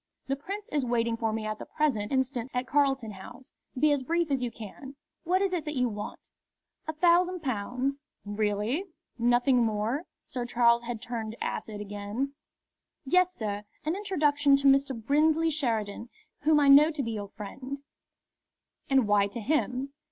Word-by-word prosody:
The 270 - -1
Prince 400 +9 -6
is 290 -2 +1
waiting 235 -1 +1
for 225 -1 -1
me 215 0 -3
at 215 0 -3
the - - -8
present 250 -10 0
instant 260 -2 0
at 250 0 0
Carlton 270 -5 +1
House. 240 +6 -11 0.3
Be 300 +3 +4
as 285 -2 +2
brief 335 +3 0
as 270 -2 +1
you 245 - -1
can. 235 +5 -10 0.3
What 370 +3 +2
is 385 -2 0
it 345 -4 -1
that 300 0 -4
you 250 -2 +2
want?" 210 -1 -7 0.6
"A 315 - -2
thousand 355 +2 +3
pounds." 255 +3 -2 0.3
"Really! 210 - -1 0.3
Nothing 245 +1 +4
more?" 225 +8 -1 0.2
Sir 250 - -4
Charles 235 -1 +3
had 235 -1 -5
turned 225 -3 -4
acid 210 -2 -4
again. 205 +7 -4 0.7
"Yes, 365 +5 +3
sir; 205 -2 -3 0.2
an 315 +3 0
introduction 295 -8 +3
to 275 0 +2
Mr. 275 -2 +3
Brinsley 310 +6 +3
Sheridan, 230 -6 -2 0.3
whom 300 0 +4
I 285 - +4
know 285 +3 +8
to 300 -3 -3
be 230 - -3
your 205 -2 -5
friend." 260 +8 -7 1.1
"And 265 -5 +4
why 205 -1 +4
to 220 +4 -6
him?" 270 +1 -1
260 Hz, 165 wpm, -28 LUFS, 225-295 Hz, 1.1 s, know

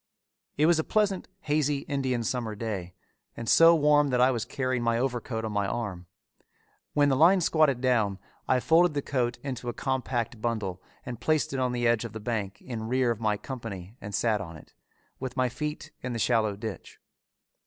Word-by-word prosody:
It 150 - +4
was 170 0 +4
a - - +1
pleasant, 205 -1 0
hazy, 145 -2 +1
Indian 135 -5 -1
summer 115 -2 -2
day, 100 -5 -5 0.4
and 115 - -6
so 165 +8 +7
warm 150 -1 +4
that 125 -2 +1
I 130 +1 +5
was 120 -2 -2
carrying 130 -1 -1
my 115 0 +1
overcoat 120 -2 -2
on 110 - -3
my 100 -1 0
arm. 100 -6 -4 0.9
When 145 -1 +4
the 135 - +3
line 170 +7 +6
squatted 155 -7 +3
down 110 -7 +2 0.3
I 130 -1 +3
folded 165 +1 +4
the 145 - -1
coat 120 -3 -1
into 125 -3 -4
a - - -3
compact 120 -4 -2
bundle 105 -6 -2 0.2
and 120 -2 -6
placed 155 -3 +1
it 135 - -1
on 125 -1 +1
the 120 -1 -1
edge 115 -1 +3
of 115 -2 -7
the 110 - -5
bank 105 -3 -3
in 115 -4 -5
rear 125 0 +2
of 115 - -3
my 105 -2 +1
company 110 -6 -7
and 100 -1 -5
sat 110 -3 +1
on 85 -4 -8
it, - - -17 0.5
with 130 0 -5
my 130 -1 +2
feet 150 +5 -5
in 125 -1 -4
the - - -2
shallow 110 -2 +2
ditch. 105 -1 -7
120 Hz, 195 wpm, -28 LUFS, 110-140 Hz, 0.9 s, so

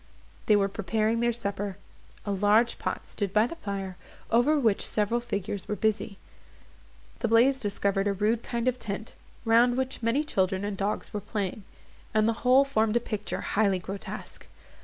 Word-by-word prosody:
They 215 - +6
were 200 -1 +3
preparing 220 +3 0
their 240 0 +2
supper; 200 -4 -4 0.5
a 205 - -2
large 210 +4 +3
pot - - -4
stood 200 -3 -3
by 215 +2 +4
the 335 +7 -6
fire, 195 - -5 0.3
over 245 +7 +4
which 225 -7 +2
several 215 +3 +1
figures 205 -4 -4
were 210 - -1
busy. 210 0 -1 1.0
The 235 - 0
blaze 245 +4 +4
discovered 200 -2 0
a 200 - +2
rude 215 +4 +1
kind 235 0 -3
of 250 0 +1
tent, 215 +2 -5 0.3
round 240 +2 +4
which 260 -1 -2
many 235 +6 +1
children 190 -8 0
and 205 -1 -3
dogs 200 +3 -3
were 210 - -3
playing, 200 -1 -4 0.5
and 215 0 +4
the 230 - +2
whole 260 +2 +5
formed 220 -5 +1
a - - +5
picture 215 -3 -4
highly 200 -2 +2
grotesque. 190 +2 -7
215 Hz, 170 wpm, -28 LUFS, 200-235 Hz, 1.0 s, They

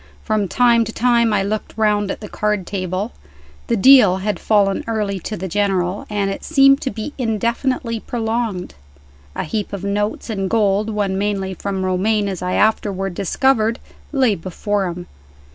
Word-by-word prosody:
From 215 -2 0
time 235 +2 +4
to 225 - -5
time 235 -1 +2
I 200 -2 +2
looked 215 +2 -4
round 210 -2 +2
at - - -4
the 210 - -7
card 210 -2 -1
table. 185 +3 -3 0.6
The 235 - +1
"deal" 215 -5 +7
had 205 +2 -2
fallen 200 -2 +2
early 210 -4 -1
to 215 +4 -5
the 190 - -4
General, 190 -1 -1
and 200 -2 -1
it - - -6
seemed 275 -2 +5
to 265 - -1
be 235 +4 -6
indefinitely 235 +1 -1
prolonged. 225 -5 -3 0.6
A - - -2
heap 210 +5 -3
of 200 -1 -5
notes 205 +1 -2
and 195 -3 -2
gold 210 -1 +1
(won 200 -3 -1
mainly 195 -2 -1
from 190 0 -3
Romayne, 200 +3 +1
as 190 -2 -4
I 180 0 -2
afterward 195 -3 +1
discovered) 225 - +1 0.3
lay 265 -6 +3
before 195 +2 -2
him. 175 0 -6
205 Hz, 165 wpm, -19 LUFS, 195-225 Hz, 0.6 s, deal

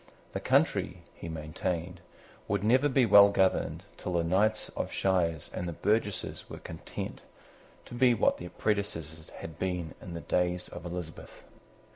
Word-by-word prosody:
The - - -3
country, - - +1
he 85 - -8
maintained, 85 +3 -3 0.5
would 100 -1 0
never 130 +7 +4
be 130 -2 +4
well 100 -1 +9
governed 95 -2 +1
till 90 - -4
the 85 -1 +2
knights 105 +6 +2
of - - -4
shires 85 -5 0
and 90 - -3
the 85 - -3
burgesses 105 +3 -1
were - - -7
content - - -7 0.6
to - - -11
be 120 0 +4
what - - +3
their 90 - -7
predecessors 80 -8 -2
had 80 -2 -9
been 90 -3 -2
in 85 - -7
the 85 - -5
days 90 0 0
of 85 - -9
Elizabeth. 85 -2 -7
90 Hz, 155 wpm, -30 LUFS, 85-105 Hz, 0.6 s, well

